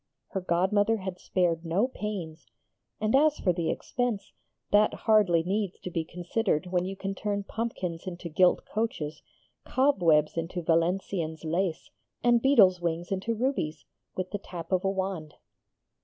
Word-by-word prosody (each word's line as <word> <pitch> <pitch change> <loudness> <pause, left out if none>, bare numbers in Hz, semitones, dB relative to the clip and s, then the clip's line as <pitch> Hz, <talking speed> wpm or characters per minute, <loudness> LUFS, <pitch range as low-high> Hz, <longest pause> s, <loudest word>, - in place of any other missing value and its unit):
Her 190 - -3
godmother 195 +5 +2
had 190 -2 -6
spared 170 -3 0
no 180 +8 +1
pains, 185 - -6 0.5
and 215 +3 +2
as 300 +2 +4
for 180 - +1
the 170 -1 -1
expense, 245 -5 -2 0.4
that 210 +1 +4
hardly 205 -7 +3
needs 195 +1 -2
to 180 - -6
be 165 -1 -1
considered 175 +1 -1
when 180 0 0
you 195 +1 -4
can 195 0 -4
turn 200 +1 -2
pumpkins 190 -6 -4
into 175 -1 -5
gilt 180 +3 +3
coaches, 210 -9 -3 0.4
cobwebs 170 - +3
into 170 +1 -3
Valenciennes 165 -1 0
lace, 170 +1 -1 0.3
and 240 -1 +4
beetles' 200 -10 +5
wings 170 +1 -2
into 195 +4 -1
rubies, 215 - -2 0.3
with 185 0 -3
the 205 - -3
tap 175 -3 -8
of 185 0 +2
a 195 - +2
wand. 190 -5 -3
185 Hz, 150 wpm, -28 LUFS, 170-210 Hz, 0.5 s, beetles